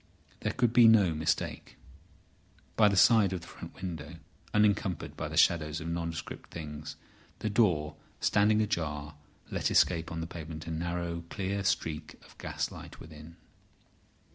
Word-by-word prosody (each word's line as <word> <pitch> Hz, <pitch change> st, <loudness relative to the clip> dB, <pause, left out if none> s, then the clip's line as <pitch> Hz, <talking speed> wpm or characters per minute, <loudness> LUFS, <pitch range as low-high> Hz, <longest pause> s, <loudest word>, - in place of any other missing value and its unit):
There -, -, -1 dB
could 120 Hz, -2 st, +1 dB
be 120 Hz, -1 st, +8 dB
no 105 Hz, -7 st, +6 dB
mistake. 80 Hz, +1 st, -2 dB, 1.0 s
By 105 Hz, -, +6 dB
the 100 Hz, -2 st, +1 dB
side 105 Hz, -2 st, +6 dB
of 90 Hz, -, -3 dB
the 85 Hz, -, -12 dB
front -, -, -10 dB
window, 85 Hz, -4 st, -6 dB, 0.4 s
encumbered 105 Hz, -4 st, +1 dB
by -, -, -4 dB
the -, -, -5 dB
shadows 80 Hz, -2 st, +3 dB
of 85 Hz, 0 st, -5 dB
nondescript 85 Hz, -1 st, -5 dB
things, 75 Hz, -2 st, -7 dB, 0.4 s
the 110 Hz, -, -3 dB
door, 85 Hz, -9 st, +2 dB, 0.2 s
standing 105 Hz, +1 st, +3 dB
ajar, 75 Hz, -7 st, -3 dB, 0.4 s
let -, -, 0 dB
escape 85 Hz, -2 st, +3 dB
on 80 Hz, -, -4 dB
the 80 Hz, -, -3 dB
pavement 80 Hz, -1 st, -7 dB
a 80 Hz, -, -5 dB
narrow, 85 Hz, +1 st, -3 dB
clear 100 Hz, 0 st, -2 dB
streak 80 Hz, -5 st, -1 dB
of -, -, -18 dB
gas -, -, -3 dB
light -, -, -10 dB
within. 80 Hz, +1 st, -12 dB
85 Hz, 150 wpm, -30 LUFS, 80-100 Hz, 1.0 s, be